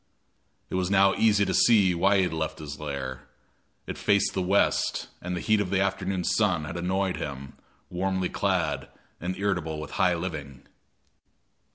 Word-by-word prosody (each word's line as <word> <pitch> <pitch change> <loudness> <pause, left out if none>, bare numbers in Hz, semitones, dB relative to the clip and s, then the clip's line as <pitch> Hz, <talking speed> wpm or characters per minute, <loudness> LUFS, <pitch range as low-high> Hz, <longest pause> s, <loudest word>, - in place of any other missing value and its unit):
It - - -6
was 90 -1 0
now 100 0 +5
easy 105 -2 +3
to 95 - -1
see 100 -5 +5
why 95 +4 +3
he 95 - +3
had 90 - -1
left 80 0 -3
his 75 -2 -8
lair; 65 -4 -5 0.6
it - - -6
faced 100 -1 +2
the 95 - -1
west, 95 +3 +1
and 90 0 -3
the - - -3
heat 110 -1 +2
of 95 - -2
the 95 - +1
afternoon 95 -1 -1
sun 95 -5 +1
had 75 - -6
annoyed 95 +2 -1
him, 70 -1 -6 0.4
warmly 95 0 -1
clad - - -1 0.3
and 90 +2 -4
irritable 85 -6 -1
with 75 - -7
high 90 -1 +2
living. 75 -6 -6
90 Hz, 170 wpm, -27 LUFS, 80-100 Hz, 0.6 s, now